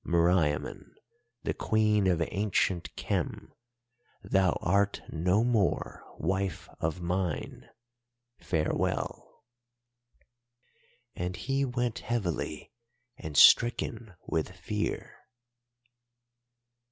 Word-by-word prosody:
Meriamun, 85 -3 +1 0.5
the - - -1
Queen 105 -2 +2
of 85 -2 +2
ancient 95 -4 0
Khem, - - -3 0.7
thou 95 -3 +2
art 100 +3 +1
no 90 +7 +2
more 115 -6 0
wife 95 +1 -2
of 80 +3 -2
mine. 90 -2 -3 0.7
Farewell.' 80 -3 -2 1.7
"And 90 +1 -3
he 135 +1 -1
went 125 -2 -2
heavily 105 -9 -3 0.4
and 75 -2 -6
stricken 115 -3 +5
with 80 - -1
fear. 90 +4 -4
95 Hz, 80 wpm, -29 LUFS, 85-105 Hz, 1.7 s, stricken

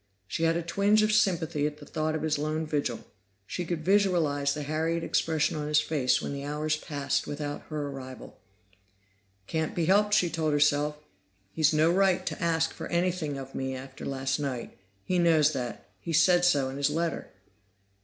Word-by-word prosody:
She 160 +10 -1
had 165 +1 +2
a 170 - -2
twinge 200 +5 +3
of 215 - +2
sympathy 170 -8 +2
at 150 0 -6
the - - -12
thought 155 0 -2
of 155 - -3
his 155 -2 0
lone 155 +1 -1
vigil; 145 -6 -2 0.4
she 175 - -4
could 165 -2 -4
visualize 170 -8 +2
the 150 - -4
harried 160 +3 -1
expression 160 -1 +1
on 150 -1 -3
his 150 0 +4
face 140 -5 +1
when - - -3
the 140 0 -5
hours 150 +2 -1
passed 145 -2 -2
without 145 0 -4
her 150 -2 -3
arrival. 130 -2 -9 1.1
"Can't 160 +7 -2
be 170 - +1
helped," 205 +3 +4
she 180 - +3
told 155 -2 0
herself. 145 0 +2 0.5
"He's 155 -2 +3
no 155 +2 +3
right 190 0 +2
to - - -4
ask 165 -1 +1
for - - -6
anything 170 -4 -1
of 135 0 -8
me 130 0 -3
after 130 0 -9
last 135 0 -2
night. 135 -5 -4 0.3
He 180 -1 0
knows 160 -3 +4
that; 125 -7 -5
he 165 - -5
said 175 +2 +5
so 145 -6 +3
in 135 - -6
his 140 0 +2
letter." 165 +2 -2
155 Hz, 185 wpm, -28 LUFS, 145-170 Hz, 1.1 s, said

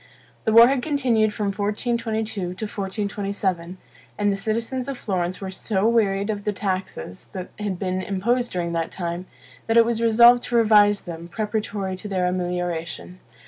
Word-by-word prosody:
The 220 - +2
war 230 +2 +9
had 265 -1 +1
continued 245 -7 +2
from 210 -1 -2
1422 220 +1 -2
to 180 - -2
1427, 195 -2 -3 0.4
and 205 -1 +2
the - - -1
citizens 230 +6 -2
of 275 - -4
Florence 185 -4 -2
were 190 -1 -5
so 195 +1 0
wearied 205 -3 +2
of 205 -1 -5
the 210 - 0
taxes 185 - -4
that 185 -1 -6
had 205 -3 -2
been 185 0 -2
imposed 235 +6 0
during 175 -2 -2
that 165 -1 -1
time, 175 0 -4 0.4
that 225 +1 +3
it 230 - +7
was 230 -1 -1
resolved 235 +2 +6
to 240 - -3
revise 210 -3 +5
them, 170 0 -8
preparatory 205 -1 -3
to 195 - -7
their 185 -3 0
amelioration. 180 -1 -3
205 Hz, 165 wpm, -23 LUFS, 185-225 Hz, 0.4 s, war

